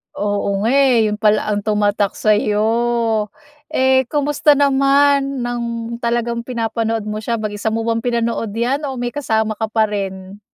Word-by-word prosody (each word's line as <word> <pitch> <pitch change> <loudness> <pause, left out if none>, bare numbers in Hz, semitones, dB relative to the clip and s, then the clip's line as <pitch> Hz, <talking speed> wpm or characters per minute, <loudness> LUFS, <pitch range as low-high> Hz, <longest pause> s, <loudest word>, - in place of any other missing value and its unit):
Oo 205 -1 -1
nga 230 - +2
eh, 255 -6 +4
yun 210 - -3
pala 215 0 +2
ang 205 - 0
tumatak 205 -1 0
sa'yo. 220 +1 +1 0.4
Eh 260 -3 +2
kumusta 295 +1 +2
naman 275 -1 +2
nang 235 -1 -4
talagang 235 0 -1
pinapanood 225 -2 -2
mo 215 0 -4
siya, 230 +1 -2
mag-isa 215 -1 -4
mo 225 +1 -1
bang 230 0 0
pinanood 230 -2 -2
'yan, 270 +6 -1
o 265 - -4
may 245 -1 -3
kasama 220 -5 -1
ka 220 - -1
pa 220 0 +1
rin? 195 0 -5
230 Hz, 155 wpm, -18 LUFS, 215-250 Hz, 0.4 s, eh